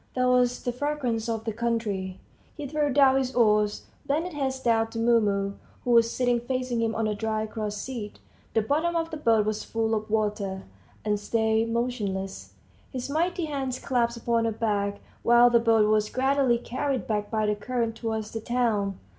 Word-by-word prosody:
There 255 Hz, 0 st, +2 dB
was 250 Hz, -1 st, +2 dB
the 245 Hz, -, 0 dB
fragrance 250 Hz, -4 st, -2 dB
of 225 Hz, -1 st, -2 dB
the 225 Hz, -1 st, -3 dB
country. 210 Hz, -5 st, -2 dB, 0.4 s
He 295 Hz, -, -5 dB
threw 295 Hz, 0 st, 0 dB
down 270 Hz, -1 st, +5 dB
his 260 Hz, -1 st, -1 dB
oars, 210 Hz, -3 st, +3 dB, 0.2 s
bent 320 Hz, +5 st, -1 dB
his 270 Hz, -3 st, -1 dB
head 265 Hz, -, -11 dB
down 225 Hz, -1 st, +2 dB
to 230 Hz, -, -8 dB
Mumu, 210 Hz, -4 st, +2 dB, 0.3 s
who 245 Hz, -, 0 dB
was 230 Hz, -1 st, +5 dB
sitting 245 Hz, -1 st, +1 dB
facing 250 Hz, -1 st, -2 dB
him 225 Hz, -1 st, 0 dB
on 225 Hz, -, 0 dB
a 215 Hz, -, 0 dB
dry 215 Hz, +1 st, -2 dB
cross 215 Hz, -1 st, -4 dB
seat 220 Hz, -2 st, -6 dB, 0.4 s
the 225 Hz, -, +3 dB
bottom 315 Hz, +8 st, 0 dB
of 330 Hz, 0 st, -1 dB
the 315 Hz, -, -4 dB
boat 225 Hz, -7 st, +3 dB
was 215 Hz, 0 st, -2 dB
full 225 Hz, 0 st, -1 dB
of 215 Hz, 0 st, -2 dB
water 210 Hz, -3 st, -1 dB, 0.4 s
and 210 Hz, -1 st, +1 dB
stayed 220 Hz, +1 st, +1 dB
motionless, 210 Hz, -5 st, -3 dB, 0.4 s
his 260 Hz, +1 st, -4 dB
mighty 345 Hz, +3 st, 0 dB
hands 270 Hz, -4 st, -3 dB
clasped 235 Hz, -3 st, -1 dB
upon 230 Hz, -1 st, +2 dB
her 225 Hz, -, +1 dB
back, 205 Hz, -2 st, -1 dB, 0.2 s
while 240 Hz, +1 st, +6 dB
the 235 Hz, -, +5 dB
boat 225 Hz, -2 st, +4 dB
was 215 Hz, 0 st, +2 dB
gradually 265 Hz, -1 st, +2 dB
carried 260 Hz, +2 st, -2 dB
back 210 Hz, -2 st, -2 dB
by 215 Hz, -1 st, 0 dB
the 210 Hz, -, +2 dB
current 230 Hz, +2 st, -2 dB
towards 220 Hz, -2 st, -3 dB
the 225 Hz, -, -4 dB
town. 220 Hz, -5 st, 0 dB
230 Hz, 190 wpm, -26 LUFS, 215-255 Hz, 0.4 s, while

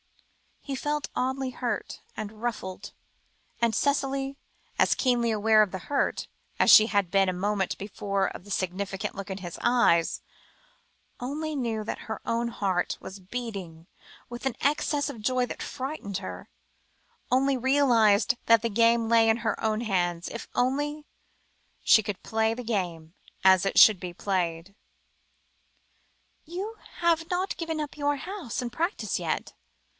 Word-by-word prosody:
He 275 Hz, -, -5 dB
felt 295 Hz, +2 st, -2 dB
oddly 260 Hz, +1 st, -1 dB
hurt 240 Hz, -4 st, -4 dB
and 215 Hz, 0 st, -7 dB
ruffled, 205 Hz, -6 st, -4 dB, 0.7 s
and 230 Hz, -1 st, +2 dB
Cicely, 275 Hz, -1 st, 0 dB, 0.4 s
as -, -, +4 dB
keenly 245 Hz, -3 st, +2 dB
aware 215 Hz, 0 st, +4 dB
of 210 Hz, -3 st, +2 dB
the 190 Hz, -, -3 dB
hurt, 285 Hz, -, 0 dB, 0.3 s
as -, -, +6 dB
she 215 Hz, -, +9 dB
had 200 Hz, -5 st, +1 dB
been 195 Hz, -1 st, +3 dB
a -, -, -1 dB
moment 195 Hz, +1 st, -1 dB
before 200 Hz, -1 st, -2 dB
of -, -, -8 dB
the 205 Hz, -, -11 dB
significant 190 Hz, +1 st, -3 dB
look 200 Hz, -1 st, -6 dB
in 190 Hz, 0 st, -4 dB
his 175 Hz, -2 st, -7 dB
eyes, 240 Hz, -9 st, +3 dB, 1.0 s
only 300 Hz, +5 st, -3 dB
knew 230 Hz, -5 st, -2 dB
that 210 Hz, -, -5 dB
her 220 Hz, -, -4 dB
own 235 Hz, +1 st, 0 dB
heart 190 Hz, -6 st, -1 dB
was 195 Hz, +1 st, -9 dB
beating 190 Hz, -6 st, -6 dB, 0.4 s
with 240 Hz, +2 st, -7 dB
an 265 Hz, -, 0 dB
excess 290 Hz, +1 st, +1 dB
of 225 Hz, -, -8 dB
joy 255 Hz, +3 st, +1 dB
that -, -, -7 dB
frightened 260 Hz, -8 st, -4 dB
her 195 Hz, -, -8 dB, 0.8 s
only 270 Hz, +1 st, +3 dB
realised 245 Hz, -4 st, +3 dB
that 230 Hz, -2 st, +6 dB
the 230 Hz, -, +1 dB
game 230 Hz, +1 st, +3 dB
lay 225 Hz, -1 st, +5 dB
in 225 Hz, -, +4 dB
her -, -, -2 dB
own 215 Hz, -1 st, +1 dB
small 235 Hz, -, -4 dB
hands, 175 Hz, -2 st, 0 dB
if 235 Hz, -, -7 dB
only 290 Hz, +4 st, 0 dB, 0.8 s
she 220 Hz, -, +6 dB
could 205 Hz, -2 st, -5 dB
play 220 Hz, 0 st, +1 dB
the 250 Hz, -, -6 dB
game 175 Hz, -8 st, -3 dB, 0.3 s
as 190 Hz, 0 st, +6 dB
it 195 Hz, -, -1 dB
should 210 Hz, -4 st, +8 dB
be 180 Hz, -1 st, -6 dB
played. 175 Hz, -1 st, -2 dB, 1.7 s
"You 385 Hz, +7 st, -6 dB, 0.2 s
have 335 Hz, -1 st, +2 dB
not 370 Hz, +2 st, -1 dB
given 325 Hz, -2 st, -3 dB
up 300 Hz, -1 st, -5 dB
your 290 Hz, 0 st, +1 dB
house 350 Hz, -, -5 dB
and 240 Hz, -, -4 dB
practice 340 Hz, -, -1 dB
yet?" -, -, -3 dB
230 Hz, 155 wpm, -27 LUFS, 195-270 Hz, 1.7 s, she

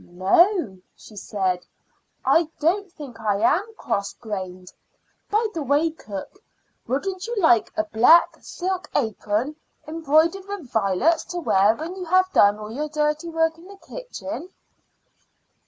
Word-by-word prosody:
"No," 195 Hz, -, +2 dB, 0.2 s
she 215 Hz, -, -15 dB
said, 185 Hz, -3 st, -2 dB, 0.6 s
"I 330 Hz, -2 st, +3 dB
don't 375 Hz, +5 st, +1 dB
think 275 Hz, -8 st, -10 dB
I 205 Hz, -2 st, 0 dB
am 405 Hz, -, +1 dB
cross 200 Hz, 0 st, -2 dB
grained. 185 Hz, -4 st, -7 dB, 0.6 s
By 430 Hz, +2 st, +2 dB
the 330 Hz, -, -3 dB
way, 290 Hz, +4 st, +2 dB
cook, 215 Hz, -, -9 dB, 0.5 s
wouldn't 370 Hz, -, -2 dB
you 475 Hz, -, -3 dB
like 320 Hz, -, +4 dB
a 320 Hz, -, +2 dB
black 320 Hz, +4 st, +5 dB
silk 370 Hz, 0 st, -4 dB
apron 225 Hz, +3 st, -1 dB, 0.3 s
embroidered 325 Hz, +4 st, +1 dB
with 400 Hz, -11 st, -7 dB
violets 220 Hz, -, +2 dB
to 355 Hz, -, -6 dB
wear 210 Hz, -, +3 dB
when 325 Hz, +8 st, -6 dB
you 370 Hz, -1 st, -6 dB
have 370 Hz, +2 st, +2 dB
done 205 Hz, -, +5 dB
all 215 Hz, 0 st, -8 dB
your 300 Hz, +6 st, -3 dB
dirty 300 Hz, +2 st, -1 dB
work 325 Hz, 0 st, 0 dB
in 345 Hz, -, -15 dB
the 400 Hz, 0 st, -12 dB
kitchen?" 370 Hz, -8 st, -8 dB
310 Hz, 140 wpm, -23 LUFS, 215-355 Hz, 0.6 s, black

